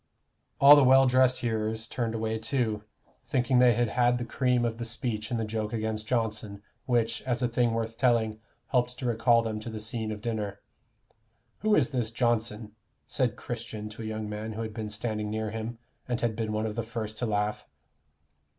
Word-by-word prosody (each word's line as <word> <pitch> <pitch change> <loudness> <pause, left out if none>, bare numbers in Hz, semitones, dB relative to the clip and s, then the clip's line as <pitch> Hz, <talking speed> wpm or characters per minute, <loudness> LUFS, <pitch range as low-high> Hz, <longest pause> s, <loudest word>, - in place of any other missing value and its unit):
All 140 +1 +10
the 145 - +6
well 135 +1 +7
dressed 130 0 +3
hearers 110 -1 -2
turned 115 -2 -2
away 110 0 -1
too, 110 -2 -1 0.4
thinking 125 0 +2
they 125 -1 +6
had 120 -1 +1
had 120 +2 +3
the 120 - -3
cream 125 -1 +1
of 115 0 -2
the - - -3
speech 115 -2 -2
in 120 - -1
the 110 - -1
joke 110 0 -3
against 110 -1 -2
Johnson, 105 -4 -2 0.2
which, 115 -2 +1
as 125 -1 -1
a - - +3
thing 120 -1 +1
worth 115 0 -3
telling, 115 -4 +2 0.3
helped 125 -1 +1
to 130 - -5
recall 115 0 +3
them 110 -1 -3
to 110 - -7
the 110 -1 -5
scene 110 0 -3
of 105 - -5
dinner. 105 -4 -3 1.0
"Who 215 0 +3
is 135 -3 +2
this 120 -5 0
Johnson?" 115 -2 -1 0.3
said 125 -5 0
Christian 110 -3 -6
to 110 +2 -9
a - - -5
young 110 0 -4
man 105 +1 -5
who 115 +1 -4
had 110 -1 -6
been 110 -1 -4
standing 105 0 -3
near 110 0 -2
him, 115 +1 -5 0.3
and 120 -2 -1
had 115 -2 0
been 110 -1 -2
one 110 +1 -1
of 110 - -2
the 115 - -2
first 110 -1 -5
to 120 - -1
laugh. 105 0 -1
115 Hz, 200 wpm, -28 LUFS, 110-120 Hz, 1.0 s, All